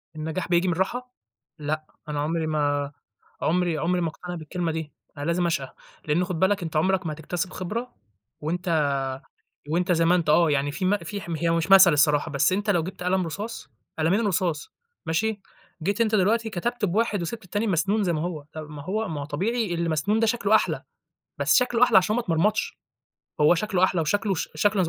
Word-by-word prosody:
النجاح 160 +3 -3
بييجي 175 +1 +3
من 180 - +2
الراحة؟ 245 +8 -2 0.5
لأ، 155 +1 -3 0.2
أنا 150 -1 -2
عُمري 160 +2 -1
ما 145 -2 0 0.5
عُمري 175 0 +1
عُمري 175 +4 0
ما 170 - +1
اقتنع 180 +3 -8
بالكلمة 170 +1 -3
دي. 160 -2 -5 0.2
أنا 145 - -4
لازم 170 +2 +1
اشقى، 140 -6 -2 0.3
لإن 155 +4 +2
خُد 175 -2 -4
بالك 190 +1 +2
أنت 160 -2 -6
عُمرك 185 +4 +2
ما 155 - -2
هتكتسب 175 +4 -4
خبرة 225 +7 -4 0.5
وأنت 160 -1 0 0.8
وأنت 180 +3 +1
زي 165 -1 +2
ما 170 +2 +4
أنت. 170 -3 0
آه، 165 +1 +5
يعني 145 0 +1
في 185 - -4
م 195 +3 +3
في 205 0 -6
حم 170 -3 -4
هي 165 +1 0
مش 165 +2 0
مثل 190 -3 +9
الصراحة 150 +1 +3
بس 140 +5 +2
أنت 205 +2 0
لو 175 -5 +2
جبت 185 +2 -7
قلم 180 0 +1
رصاص، 210 +8 -6 0.3
قلمين 185 +8 +2
رصاص 175 -5 -1 0.3
ماشي؟ 205 +6 0 0.4
جيت 200 +6 -1
أنت 220 -1 +2
دلوقتي 220 +3 +2
كتبت 235 +4 -2
بواحد 205 +1 +1
وسيبت 220 +5 -5
التاني 205 +5 -2
مسنون 200 +3 +1
زي 175 - +1
ما 155 - -1
هو، 160 -3 -4
ما 150 -2 -7
هو 215 +6 -2
ما 155 -4 -4
هو - - -4
طبيعي 195 +7 -1
اللي 170 0 -1
مسنون 165 +8 +1
ده 225 - +3
شكله 220 -2 +2
أحلى، - - +2 0.6
بس - - +3
شكله 250 -1 +3
أحلى - - +6
عشان 200 +3 +3
ما 245 - +1
اتمرمطش. 200 +1 0 0.6
هو 150 +3 +6
شكله 185 0 +1
أحلى 185 -2 +1
وشكله 200 +5 0
ش 160 - -3
شكله 195 +5 +2
زي 170 - 0
175 Hz, 200 wpm, -25 LUFS, 160-205 Hz, 0.8 s, مثل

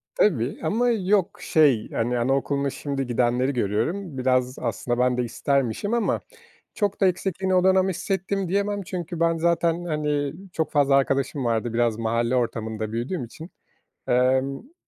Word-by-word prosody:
Tabii 135 - +1
ama 230 +10 +1
yok, 200 -4 +1
şey, 140 -9 +3
hani, 120 +2 0
anaokuluna 140 +3 0
şimdi 135 -1 -4
gidenleri 125 +2 +1
görüyorum. 130 - -1
Biraz 130 0 +1
aslında 120 +1 -2
ben 125 0 +2
de 125 - +1
istermişim 135 - -1
ama 235 -2 +1 0.5
çok 205 -2 -1
da 195 - +5
eksikliğini 185 +1 0
o 180 0 +3
dönem 190 0 +4
hissettim 190 +1 -2
diyemem 200 +2 0
çünkü 175 -2 -5
ben 165 0 +3
zaten, 170 +1 +1
hani, 150 -3 -1 0.2
çok 160 -2 -1
fazla 140 -2 +3
arkadaşım 135 0 0
vardı. 115 0 -1
Biraz 115 -2 +1
mahalle 115 +2 0
ortamında 110 -3 -2
büyüdüğüm 125 +6 -3
için. 160 +9 -11 0.6
Emm 130 - +1
140 Hz, 145 wpm, -24 LUFS, 120-180 Hz, 0.6 s, da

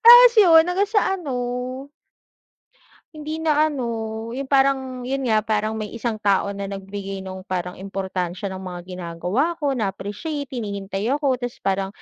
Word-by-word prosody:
Tapos 485 0 +11
'yon 340 -4 +7
hanggang 380 +3 +2
sa 410 -3 +2
ano 300 -8 -5 1.8
hindi 310 +1 -5
na 310 -1 +3
ano 255 -4 -2 0.5
yung 275 - -2
parang 270 -1 +2
yo'n 265 +2 -2
nga 215 - +5
parang 215 0 0
may 210 - -3
isang 225 -2 -2
tao 200 0 +2
na 200 0 -5
nagbigay 195 0 -6
nung 190 0 -6
parang 180 -1 -3
importansya 190 -1 -3
ng 190 - -6
mga 180 -2 -6
ginagawa 180 - -2
ko, 290 -4 0
na-appreciate 255 - -3
hinihintay 200 -3 -3
ako, 275 -4 0
tapos 245 -1 -4
parang 195 0 +1
220 Hz, 150 wpm, -23 LUFS, 195-290 Hz, 1.8 s, Tapos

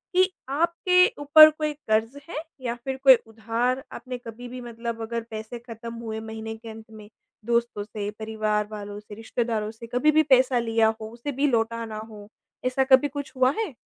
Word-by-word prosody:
कि 370 +1 +5 0.2
आपके 340 +5 +3 0.2
ऊपर 310 +2 +9
कोई 305 0 -3
कर्ज़ 225 -2 -1
है - - -6 0.3
या 240 -2 -2
फ़िर 265 +2 -5
कोई 265 -2 +10
उधार 230 +4 -1
आपने 255 -1 -6
कभी 245 0 -9
भी 250 +1 -7
मतलब 235 -1 -5
अगर 230 +1 -3
पैसे 220 +2 -6
ख़त्म 230 -1 -9
हुए 225 -1 -5
महीने 220 0 -6
के 225 0 -11
अंत 220 0 -10
में 215 -1 -12 0.4
दोस्तों 235 -3 0
से, 205 -1 -5
परिवार 215 -1 -1
वालों 205 -1 -7
से, 210 0 -12
रिश्तेदारों 225 -1 -2
से 230 +1 -11
कभी 250 +6 +3
भी 310 +1 +4
पैसा 255 -1 +4
लिया 225 -1 +2
हो 220 - -6
उसे 240 +5 -5
भी 280 +3 +1
लौटा 230 -2 0
ना 220 -1 -7
हो? 205 -2 -11 0.4
ऐसा 255 +1 +2
कभी 265 +1 +5
कुछ 285 -1 -6
हुआ 255 0 +4
है? 420 - -3
235 Hz, 190 wpm, -25 LUFS, 220-265 Hz, 0.4 s, कोई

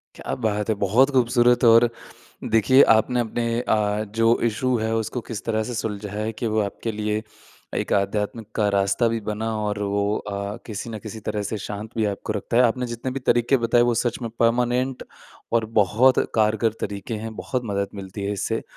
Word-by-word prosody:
क्या - - -4
बात 105 0 0
है! 110 - +2
बहुत 120 +8 +4
खूबसूरत 120 -1 +3
और 115 +1 +7 0.6
देखिए 115 +5 +6
आपने 120 +3 +1
अपने 115 +1 -2 0.2
अ, 105 -2 0
जो 115 +2 +2
इशू 125 +3 0
है 110 0 -1
उसको 115 +2 -2
किस 115 -3 -5
तरह 110 -1 0
से 120 - -4
सुलझाया 105 -1 -4
है 110 - -2
कि 120 - -1
वो 110 - +3
आपके 105 +3 -3
लिए 105 0 -2 0.5
एक - - -2
आध्यात्मिक 105 +2 -1
का 105 -1 +2
रास्ता 100 +3 +2
भी 115 0 -1
बना, 110 +2 -2
और 105 -1 -2
वो 100 +1 0
अ, 100 +1 -5
किसी 110 +1 -5
न 110 - -5
किसी 110 +2 -8
तरह 105 -1 -1
से 110 - -3
शांत 105 +2 -6
भी 110 - +1
आपको 105 - -5
रखता 110 +3 -3
है। 125 - +7
आपने 125 +1 +1
जितने 120 +2 -4
भी 135 - -4
तरीके 120 +3 +3
बताए 120 +1 +4
वो 120 - +1
सच 120 -1 -1
में 115 - -3
परमानेंट 125 +2 +1 0.5
और 115 -1 +2
बहुत 115 +7 +4 0.2
कारगर 110 0 +2
तरीके 100 +2 -4
हैं। 110 -1 -6
बहुत 130 -1 -3
मदद 100 0 -1
मिलती 95 +1 -7
है 100 - -1
इससे 100 - -2
110 Hz, 195 wpm, -23 LUFS, 105-120 Hz, 0.6 s, और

